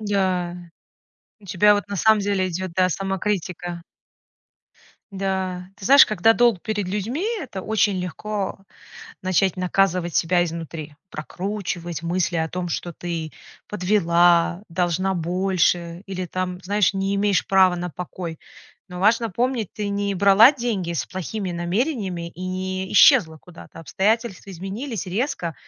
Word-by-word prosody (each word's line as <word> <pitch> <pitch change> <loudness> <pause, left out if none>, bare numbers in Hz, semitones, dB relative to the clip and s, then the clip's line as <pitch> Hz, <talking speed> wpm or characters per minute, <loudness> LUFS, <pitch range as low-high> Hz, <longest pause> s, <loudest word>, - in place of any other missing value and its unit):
Да. 185 -4 -1 0.8
У - - -19
тебя 200 +3 +4
вот 205 0 -3
на 200 - -4
самом 220 +3 +4
деле 195 -2 0
идет, 185 0 -4
да, 185 +1 +2
самокритика. 185 -2 -3 1.3
Да. 190 -2 -3
Ты 215 - -11
знаешь, 280 +1 +8
когда 215 +2 +3
долг 235 -5 +2
перед 210 -3 -2
людьми, 210 - -3 0.2
это 235 - -6
очень 210 -2 +1
легко 195 +3 -4 0.6
начать 185 0 +1
наказывать 180 -1 0
себя 175 +1 +2
изнутри, 165 -2 -7 0.2
прокручивать 175 0 -5
мысли 175 +1 -1
о 160 0 0
том, 180 +1 -4
что 175 +1 -4
ты: 165 -2 -5 0.3
подвела, 175 -3 +2
должна 180 +2 0
больше 175 0 0
или 185 -2 -4
там, 180 0 -4
знаешь, 205 +1 +2
не 195 0 -1
имеешь 200 -1 +1
права 190 -2 +4
на 175 0 -4
покой. 175 -1 -7 0.5
Но 180 0 -7
важно 225 +3 +3
помнить, 235 0 -1
ты 210 -1 -4
не 200 0 -1
брала 200 +6 +7
деньги 225 - -2
с 170 - -2
плохими 185 +1 -4
намерениями 180 - -2
и 180 - -9
не 185 0 -4
исчезла 200 - +6
куда-то. 170 0 -14
Обстоятельства 200 +3 -1
изменились 195 +5 -5
резко 180 - -2
185 Hz, 135 wpm, -22 LUFS, 175-205 Hz, 1.3 s, знаешь